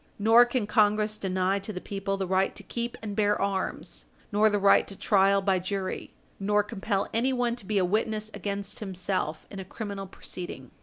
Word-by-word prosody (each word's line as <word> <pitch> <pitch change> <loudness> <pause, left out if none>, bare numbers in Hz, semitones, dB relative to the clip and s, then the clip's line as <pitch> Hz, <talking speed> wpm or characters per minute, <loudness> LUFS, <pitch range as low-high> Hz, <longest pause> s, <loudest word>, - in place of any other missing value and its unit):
Nor 225 +3 +7
can 240 -2 -1
Congress 210 0 +2
deny 190 -1 0
to 200 +2 -6
the 185 - -5
people 195 0 -3
the 195 - -1
right 190 +1 +1
to 205 - -6
keep 235 +4 -4
and 205 -2 -4
bear 210 -1 +2
arms, 195 -1 -2 0.3
nor 210 +1 +4
the 205 - +1
right 200 0 +5
to 195 - -7
trial 195 0 +3
by 190 -2 +2
jury, 190 +1 -4 0.3
nor 205 +1 +2
compel 200 -1 -2
anyone 245 0 +1
to 200 - -9
be 215 - 0
a 185 - +3
witness 215 +2 -1
against 200 -1 -4
himself 185 -5 -3
in 195 - -7
a - - -4
criminal 200 0 -6
proceeding. 175 -9 -7
200 Hz, 190 wpm, -28 LUFS, 190-215 Hz, 0.3 s, Nor